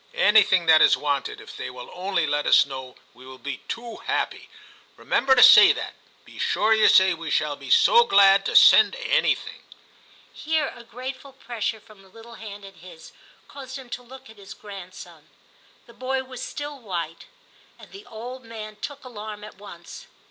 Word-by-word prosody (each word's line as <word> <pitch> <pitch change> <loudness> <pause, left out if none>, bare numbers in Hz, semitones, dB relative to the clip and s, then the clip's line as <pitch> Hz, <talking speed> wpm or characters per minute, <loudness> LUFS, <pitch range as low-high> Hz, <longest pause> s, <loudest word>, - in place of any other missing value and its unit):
Anything 200 -4 +4
that 160 -1 +5
is - - +5
wanted, 145 -2 -3
if - - -13
they 125 - -7
will 125 -1 -11
only 180 -2 -2
let 145 0 -2
us - - +5
know, 130 -2 -9 0.2
we 125 +2 -18
will 130 0 -12
be 140 +1 -7
too 235 -1 -7
happy; - - -4 0.5
remember 265 0 +1
to 245 - +6
say - - +8
that; - - -7 0.3
be - - -15
sure 220 +1 +1
you 220 -1 +4
say 190 -1 +5
we 165 -1 -8
shall 150 -1 -1
be - - -12
so 470 +1 +5
glad 195 - +5
to - - -4
send - - +6
anything.' - - -1 0.7
Here 315 -2 -2
a 235 - -13
grateful 260 +3 -9
pressure 235 -4 -5
from 215 -2 -20
the 190 - -21
little 225 +3 -15
hand 205 -3 -11
in 195 - -13
his 170 -2 -15 0.4
caused 265 -1 -10
him 260 -2 -13
to 250 - -6
look 260 +2 -15
at 220 - -16
his 200 -1 -12
grand. 195 -3 -11
son. - - -14 0.6
The 235 - -18
boy 260 +2 -3
was 255 -1 -11
still 290 +1 -7
white, 170 -7 -6 0.5
and - - -17
the 395 +1 -13
old 245 +3 -9
man 215 -2 -10
took 280 +5 -8
alarm 215 -3 -9
at 210 - -13
once. 205 - -12
215 Hz, 185 wpm, -23 LUFS, 180-255 Hz, 0.7 s, say